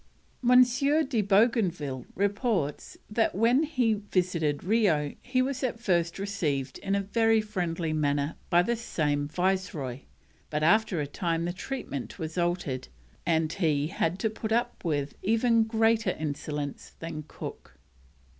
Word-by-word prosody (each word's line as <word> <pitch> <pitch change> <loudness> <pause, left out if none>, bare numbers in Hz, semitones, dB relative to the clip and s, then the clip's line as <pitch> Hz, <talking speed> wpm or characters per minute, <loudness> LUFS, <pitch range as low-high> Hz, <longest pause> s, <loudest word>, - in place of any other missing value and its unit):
M. 250 +1 +8
de 275 0 +1
Bougainville 190 - +1
reports 200 - -1
that 220 -1 +1
when 235 +7 +4
he 255 -8 +1
visited 180 -7 -1
Rio 180 -9 +2
he 255 0 +1
was 265 0 -3
at 235 -3 -1
first 175 -6 +1
received 155 -10 -2
in 195 0 -1
a 200 - +1
very 225 +2 +3
friendly 175 -6 -2
manner 145 0 0
by 175 0 +5
this 235 +3 -1
same 145 -8 0
Viceroy, 170 -6 -1 0.5
but 150 0 -1
after 195 +1 +3
a - - -1
time 165 +3 -1
the 175 - -2
treatment 185 - -5
was 160 0 -5
altered, 175 -7 -1 0.4
and 160 -1 +2
he 155 -5 +1
had 170 +1 -1
to 220 +3 0
put 220 0 -5
up 235 +2 0
with 145 -4 -1
even 230 +2 +3
greater 225 0 +2
insolence 145 -1 -4
than 165 -2 -6
Cook. - - -9
185 Hz, 140 wpm, -28 LUFS, 155-225 Hz, 0.5 s, M